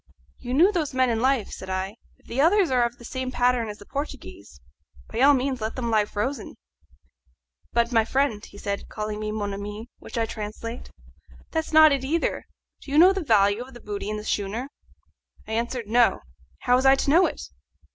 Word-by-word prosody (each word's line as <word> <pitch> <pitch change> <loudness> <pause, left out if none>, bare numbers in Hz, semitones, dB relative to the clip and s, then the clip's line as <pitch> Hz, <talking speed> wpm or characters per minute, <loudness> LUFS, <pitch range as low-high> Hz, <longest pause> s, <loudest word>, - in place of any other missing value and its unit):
"You 250 0 -4
knew 355 +8 +6
those 315 -8 -2
men 255 -1 +3
in 225 - 0
life," 260 -3 +1
said 190 - -8
I. 190 +3 -3 0.2
"If - - -31
the 255 +4 -1
others 360 +1 +4
are 250 -1 +3
of 235 0 -2
the 240 - -13
same 260 +1 -4
pattern 245 -2 +1
as 210 - -7
the 205 - -14
Portuguese, 285 +6 -7 0.5
by 225 - -4
all 285 +1 +7
means 260 -1 -2
let 220 +1 -3
them 235 -3 -2
lie 215 -2 +3
frozen." 245 +7 -4 1.2
"But, 235 +1 +1
my 225 -2 +4
friend," 235 -3 0
said 200 0 -5
he, - - -14
calling 210 -1 -5
me 215 0 -3
mon 205 -2 -3
ami, 210 +4 -7
which - - -9
I 230 - +2
translate, 225 +2 -7 0.6
"that's 320 -1 -2
not 315 -1 +8
it, 275 -2 0
either. 320 +5 -1 0.3
Do - - -12
you 285 - 0
know 365 +4 +8
the 390 - -2
value 205 -4 +3
of 255 +1 -10
the - - -10
booty 205 -2 -5
in 215 - -2
this 210 - -7
schooner?" 215 +6 -2 0.8
I - - -7
answered, 235 +1 -2
No; 235 +2 +3 0.4
how 245 0 +3
was 260 - 0
I 270 - +7
to 275 - -1
know 350 +4 +6
it? - - -7
240 Hz, 205 wpm, -25 LUFS, 215-270 Hz, 1.2 s, not